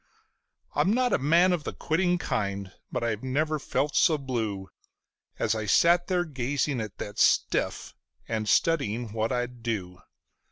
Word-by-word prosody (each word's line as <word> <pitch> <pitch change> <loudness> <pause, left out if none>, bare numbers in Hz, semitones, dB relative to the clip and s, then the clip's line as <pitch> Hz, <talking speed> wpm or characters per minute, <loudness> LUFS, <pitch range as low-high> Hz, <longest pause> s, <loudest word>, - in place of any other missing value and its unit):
I'm 190 - +2
not 250 -1 +2
a - - +3
man 170 +7 +4
of 170 -4 -2
the - - -5
quitting 175 +2 +1
kind, 100 - -3 0.2
but - - -2
I 115 -1 +1
never 150 +4 -1
felt 145 +1 -1
so 155 - +4
blue 110 -8 -3 0.7
As 110 - +1
I 110 -1 -3
sat 175 +6 +4
there 180 -2 +1
gazing 135 -2 -1
at 105 -2 -7
that 105 - -6
stiff - - +1 0.3
and 110 -2 -2
studying 115 -4 +1
what 110 +1 -1
I'd 125 -1 -3
do. 95 -6 -4
125 Hz, 155 wpm, -27 LUFS, 110-160 Hz, 0.7 s, man